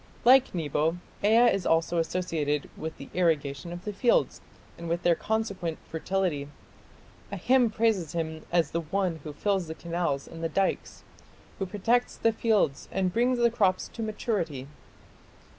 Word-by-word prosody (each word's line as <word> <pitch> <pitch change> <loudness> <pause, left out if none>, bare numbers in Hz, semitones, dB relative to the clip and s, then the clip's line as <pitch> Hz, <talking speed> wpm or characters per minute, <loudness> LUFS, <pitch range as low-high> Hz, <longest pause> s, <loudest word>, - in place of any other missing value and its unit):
Like 260 -3 +6
Nebo, 160 +1 0 0.3
Ea 230 +3 +6
is 195 - -1
also 165 +1 +2
associated 160 -4 -1
with 160 0 -6
the - - -10
irrigation 160 -3 0
of 175 +1 -8
the 210 - -3
fields 235 +4 +2 0.3
and 170 0 -7
with 170 +1 -1
their 175 - +5
consequent 200 -4 -2
fertility. 165 -4 -2 0.8
A - - -3
hymn 255 -2 +3
praises 210 -8 0
him 160 -2 -3
as 170 -4 +2
the 170 - -1
one 175 +1 -1
who 155 - -6
fills 190 +3 -1
the 160 - -6
canals 170 -5 -2
and 165 0 -9
the 165 - 0
dikes, 195 +4 -1 0.6
who 195 - -2
protects 230 +6 +1
the 230 - +2
fields 215 -11 +1
and 185 -2 0
brings 245 +3 +2
the 235 -1 +3
crops 195 -5 +1
to 230 - -8
maturity." 195 - -2
175 Hz, 160 wpm, -28 LUFS, 160-215 Hz, 0.8 s, Like